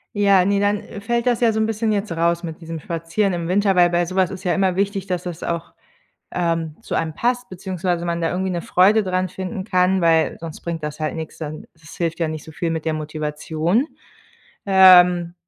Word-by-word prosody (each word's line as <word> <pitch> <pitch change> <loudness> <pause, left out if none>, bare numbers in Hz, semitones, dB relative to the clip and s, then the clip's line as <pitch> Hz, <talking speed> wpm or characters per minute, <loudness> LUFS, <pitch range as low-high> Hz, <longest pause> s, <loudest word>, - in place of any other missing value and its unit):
Ja, 200 -3 +4
ne, 200 +1 +2
dann, 205 +1 +2
äh, 210 -1 -10
fällt 235 +2 -1
das 245 -2 +1
ja 235 -2 +4
so 220 - -1
'n 220 - +2
bisschen 220 0 -1
jetzt 205 -2 -1
raus 170 +1 0
mit 165 0 -7
diesem 165 0 -6
Spazieren 170 +5 -1
im 170 -1 -3
Winter, 195 +2 +2
weil 175 -1 +5
bei 175 0 +1
sowas 185 0 +1
ist 190 0 -8
ja 180 - +1
immer 190 -2 +1
wichtig, 195 0 -1
dass 180 -2 -2
das 175 -3 -6
auch, 170 -1 -4 0.6
ähm, 165 -3 -1
zu - - -3
einem 160 -1 -2
passt 245 +3 -1
beziehungsweise 180 -2 -3
man 170 0 -2
da 165 - 0
irgendwie 190 +1 -2
'ne 175 -1 -2
Freude 200 +6 +3
dran 185 0 -1
finden 190 +2 -5
kann, 185 -1 +2
weil 165 -2 +3
sonst 165 -2 -8
bringt 170 -2 -4
das 150 0 -5
halt 155 -1 -2
nix 160 -1 -7
dann 155 -1 -6
das 155 -2 -15
hilft 165 -1 -2
ja 165 - 0
nicht 155 -1 -5
so - - -12
viel 165 +2 -3
mit 160 -1 -3
der 160 - 0
Motivation, 155 - -1 0.8
ähm. 180 -3 +6
180 Hz, 220 wpm, -21 LUFS, 165-195 Hz, 0.8 s, ähm